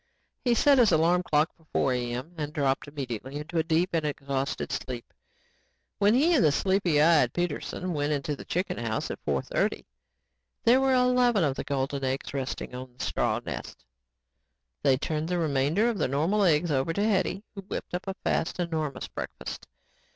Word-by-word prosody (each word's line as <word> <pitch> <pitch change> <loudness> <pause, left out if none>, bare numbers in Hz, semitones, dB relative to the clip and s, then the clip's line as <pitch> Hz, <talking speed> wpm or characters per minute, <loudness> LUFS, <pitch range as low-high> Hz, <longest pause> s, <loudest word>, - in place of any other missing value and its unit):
He 245 -2 +3
set 280 +3 +5
his 230 -5 +5
alarm 170 +2 +4
clock 155 -2 +2
for 155 -4 -1
4:00 120 -1 -2
a.m. 130 +8 -5
and 150 -2 -4
dropped 140 -2 0
immediately 135 -2 -5
into 155 +3 -2
a - - +2
deep 165 +2 +1
and 165 -2 +1
exhausted 140 -2 -2
sleep. 125 -3 -5 0.9
When 205 +3 +4
he 315 +7 +4
and 275 - +4
the 150 - +5
sleepy 190 -1 +2
eyed 150 -6 +5
Peterson 175 +1 -2
went 145 -1 0
into 145 0 -1
the - - -9
chicken 180 -5 -2
house 110 -2 -2
at - - -8
4:30, - - -1 0.8
there 250 +3 +5
were 265 -1 +3
eleven 250 -5 +3
of 140 -3 +1
the - - -4
golden 135 0 -2
eggs 130 +1 -2
resting 135 -2 -4
on 125 0 -8
the - - -3
straw - - 0
nests. - - -7 1.0
They 135 -2 +4
turned 155 +3 -2
the 180 - 0
remainder 155 - +2
of 230 -5 -1
the 155 - +2
normal 165 +10 +2
eggs 165 -1 +3
over 135 +4 +1
to 200 - 0
Hetty 195 -1 0
who 200 - -7
whipped 195 -1 -6
up 180 +2 -3
a 190 - -3
fast 160 - -1
and 175 -2 -1
enormous 150 -5 -2
breakfast. - - -7
155 Hz, 185 wpm, -27 LUFS, 140-190 Hz, 1.0 s, set